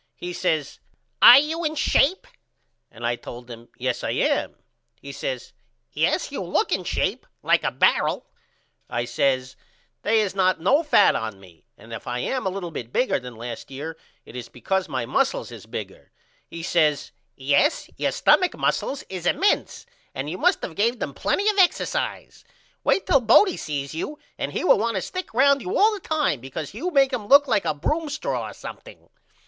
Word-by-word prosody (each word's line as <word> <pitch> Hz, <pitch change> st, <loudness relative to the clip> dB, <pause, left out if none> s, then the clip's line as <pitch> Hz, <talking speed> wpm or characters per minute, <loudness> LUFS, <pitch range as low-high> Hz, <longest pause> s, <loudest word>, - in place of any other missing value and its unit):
He 180 Hz, 0 st, -6 dB
says 155 Hz, -6 st, -1 dB, 0.4 s
Are 245 Hz, -, +11 dB
you 315 Hz, +4 st, 0 dB
in 310 Hz, 0 st, -1 dB
shape? 315 Hz, +4 st, +2 dB, 0.6 s
And 120 Hz, +1 st, -8 dB
I 120 Hz, 0 st, +1 dB
told 120 Hz, 0 st, -10 dB
him 115 Hz, 0 st, -11 dB
Yes 125 Hz, -1 st, -2 dB
I -, -, -2 dB
am. -, -, 0 dB, 0.4 s
He 140 Hz, -, -9 dB
says 130 Hz, -2 st, -5 dB, 0.4 s
Yes -, -, 0 dB
you -, -, -4 dB
look -, -, 0 dB
in -, -, 0 dB
shape -, -, -2 dB, 0.2 s
like -, -, +3 dB
a -, -, +1 dB
barrel. -, -, +1 dB, 0.6 s
I 120 Hz, 0 st, -2 dB
says 130 Hz, +1 st, 0 dB, 0.5 s
They 220 Hz, +1 st, +2 dB
is 200 Hz, -3 st, -2 dB
not 185 Hz, -2 st, +2 dB
no 260 Hz, -, +3 dB
fat 300 Hz, -10 st, +4 dB
on 110 Hz, -3 st, -4 dB
me 90 Hz, -4 st, -18 dB
and 115 Hz, 0 st, -12 dB
if 115 Hz, -, -8 dB
I 120 Hz, -, -2 dB
am 250 Hz, -, -2 dB
a -, -, +2 dB
little 185 Hz, -2 st, -5 dB
bit 120 Hz, -6 st, -7 dB
bigger 250 Hz, -, +1 dB
than 125 Hz, -1 st, -10 dB
last 115 Hz, 0 st, -7 dB
year 145 Hz, +4 st, -6 dB, 0.3 s
it -, -, -13 dB
is 125 Hz, -2 st, -7 dB
because 190 Hz, +9 st, -2 dB
my 130 Hz, -3 st, -2 dB
mussels -, -, 0 dB
is -, -, -11 dB
bigger. -, -, -8 dB, 0.4 s
He 165 Hz, 0 st, -8 dB
says 155 Hz, -4 st, +1 dB, 0.2 s
Yes 145 Hz, -, +1 dB
your -, -, 0 dB
stumach 365 Hz, -, +3 dB
mussels 275 Hz, -, -1 dB
is 180 Hz, -2 st, -5 dB
emense 400 Hz, -, +1 dB, 0.3 s
and 130 Hz, +2 st, -4 dB
you 180 Hz, -, -6 dB
must -, -, +2 dB
of 165 Hz, -, -4 dB
gave 230 Hz, +6 st, +1 dB
them -, -, -4 dB
plenty 405 Hz, -, 0 dB
of 415 Hz, -1 st, +2 dB
exercise. 380 Hz, +6 st, 0 dB, 0.4 s
Wait 390 Hz, -, +2 dB
till 275 Hz, -, +4 dB
Bodie 340 Hz, -, +5 dB
sees 140 Hz, -2 st, -4 dB
you 235 Hz, -, -5 dB, 0.2 s
and -, -, -2 dB
he -, -, -2 dB
will 360 Hz, -, +5 dB
want 230 Hz, +1 st, -1 dB
to 190 Hz, -, -1 dB
stick 370 Hz, 0 st, -6 dB
round 275 Hz, +3 st, +4 dB
you 385 Hz, +6 st, -2 dB
all 430 Hz, +2 st, +5 dB
the 415 Hz, -, -5 dB
time 305 Hz, -, 0 dB
because 135 Hz, +5 st, -7 dB
you 295 Hz, -, -3 dB
make 275 Hz, -5 st, +3 dB
him 220 Hz, -5 st, -3 dB
look 280 Hz, +3 st, +6 dB
like 205 Hz, -, +1 dB
a 150 Hz, -, 0 dB
broom 305 Hz, -, -2 dB
straw 295 Hz, +2 st, -3 dB
or -, -, -10 dB
something. -, -, -11 dB
185 Hz, 190 wpm, -23 LUFS, -, 0.6 s, Are